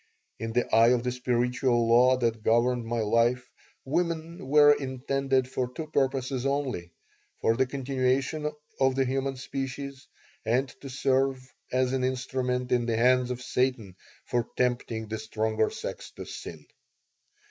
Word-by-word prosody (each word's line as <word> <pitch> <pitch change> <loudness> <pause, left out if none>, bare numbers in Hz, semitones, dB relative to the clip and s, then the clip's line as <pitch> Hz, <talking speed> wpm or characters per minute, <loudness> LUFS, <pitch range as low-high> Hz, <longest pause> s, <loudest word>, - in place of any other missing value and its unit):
In 115 +1 -4
the 125 +1 +1
eye 115 +1 +7
of 120 -1 +3
the 125 - 0
spiritual 125 -1 +1
law 125 +2 +5
that 115 -3 0
governed 120 +1 +2
my 115 0 -1
life 115 +3 +2 0.4
women 165 0 -2
were 145 +1 +7
intended 135 -1 -1
for 130 -1 -3
two 155 +5 -5
purposes 135 -2 0
only: 135 -10 -1 0.5
for 115 - +2
the 130 +2 +2
continuation 135 +3 -1 0.3
of 135 -1 +3
the 135 0 +2
human 135 +1 -1
species 135 +1 -5 0.4
and 125 +4 +1
to 140 - -7
serve 130 0 0 0.2
as 130 0 +1
an 130 -1 0
instrument 125 -1 -1
in 120 -1 +2
the 115 -1 0
hands 125 +1 +3
of 125 0 -4
Satan 125 -8 -1 0.3
for 120 -2 -1
tempting 120 -3 -1
the 110 +1 -4
stronger 110 0 0
sex - - -6
to - - -7
sin. 80 -3 -8
125 Hz, 145 wpm, -28 LUFS, 120-135 Hz, 0.5 s, eye